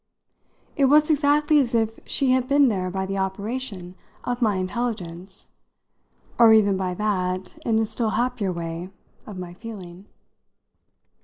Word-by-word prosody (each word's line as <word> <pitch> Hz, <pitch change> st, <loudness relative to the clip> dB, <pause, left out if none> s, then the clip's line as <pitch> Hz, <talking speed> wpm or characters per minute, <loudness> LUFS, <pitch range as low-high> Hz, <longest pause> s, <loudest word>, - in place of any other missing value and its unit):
It 280 Hz, -, +3 dB
was 300 Hz, +3 st, +5 dB
exactly 295 Hz, +1 st, +3 dB
as 240 Hz, -4 st, 0 dB
if 225 Hz, -1 st, 0 dB
she 270 Hz, -3 st, +1 dB
had 255 Hz, -1 st, +2 dB
been 280 Hz, -1 st, +4 dB
there 185 Hz, -4 st, -1 dB
by 190 Hz, +1 st, -3 dB
the 195 Hz, 0 st, -3 dB
operation 195 Hz, -1 st, -4 dB, 0.3 s
of 245 Hz, +1 st, -3 dB
my 215 Hz, -4 st, +2 dB
intelligence, 190 Hz, -2 st, -4 dB, 0.9 s
or 230 Hz, -2 st, +8 dB
even 205 Hz, -3 st, +4 dB
by 185 Hz, -1 st, -2 dB
that 185 Hz, -2 st, -2 dB
in 225 Hz, -1 st, +2 dB
a 220 Hz, -, +2 dB
still 220 Hz, +1 st, -2 dB
happier 235 Hz, -4 st, -1 dB
way 170 Hz, +1 st, -5 dB, 0.4 s
of 205 Hz, -3 st, -8 dB
my 180 Hz, -1 st, -7 dB
feeling. 190 Hz, -3 st, -10 dB
210 Hz, 145 wpm, -24 LUFS, 185-245 Hz, 0.9 s, or